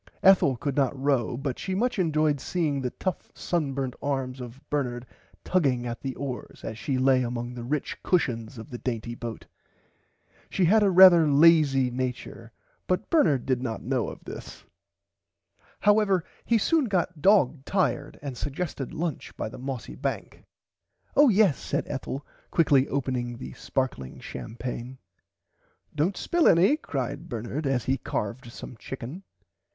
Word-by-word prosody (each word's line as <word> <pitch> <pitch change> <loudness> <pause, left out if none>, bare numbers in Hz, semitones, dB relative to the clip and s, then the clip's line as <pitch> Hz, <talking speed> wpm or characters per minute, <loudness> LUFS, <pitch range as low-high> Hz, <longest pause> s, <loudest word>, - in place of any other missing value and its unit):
Ethel 180 -9 +6
could 140 +3 -3
not 135 -1 +1
row 130 -4 +1
but 135 -1 -3
she 190 -1 -3
much 245 +2 0
enjoyed 155 -4 +2
seeing 155 -6 -1
the 125 - -1
tough 185 +7 -4
sunburnt 135 -6 -2
arms 135 -2 -2
of 125 +1 -9
Bernard 125 -4 -2 0.4
tugging 135 -9 +1
at 120 -1 -5
the 135 -2 -4
oars 135 -3 -6
as 110 +1 -6
she 135 -3 -1
lay 130 0 +4
among 120 0 -3
the 120 -1 -7
rich 140 +4 -3
cushons 120 -9 0
of 115 +6 -10
the 120 - -6
dainty 120 -2 -3
boat. 120 -1 -7 1.0
She 185 - +1
had 215 +6 +5
a 205 - +4
rarther 180 -3 +8
lazy 140 -4 +5
nature 125 -2 -5 0.4
but 185 - -1
Bernard 155 - +3
did 130 -2 0
not 115 -4 -4
know 125 -2 0
of - - -11
this. - - -9 1.2
However 205 -3 +4 0.2
he 235 - +3
soon 310 +7 +2
got 180 -6 -1
dog 155 -7 +4
tired 145 -5 -1
and 140 -3 -4
sugested 145 +1 -4
lunch 165 -3 -4
by - - -3
the - - -10
mossy 130 - -5
bank. - - -4 0.7
Oh 290 -1 +7
yes 200 - +4
said - - -2
Ethel 135 0 -5 0.2
quickly 140 -5 +4
opening 125 -3 -2
the 125 - -8
sparkling 125 - -3
champaigne. 120 - -6 1.0
Dont 160 +6 0
spill 345 -2 +2
any 185 - +5
cried 145 - -4
Bernard 120 +5 -3
as 130 -3 0
he 135 +1 +1
carved 115 +4 -4
some 125 - -9
chicken. 135 - -7
135 Hz, 150 wpm, -27 LUFS, 125-170 Hz, 1.2 s, rarther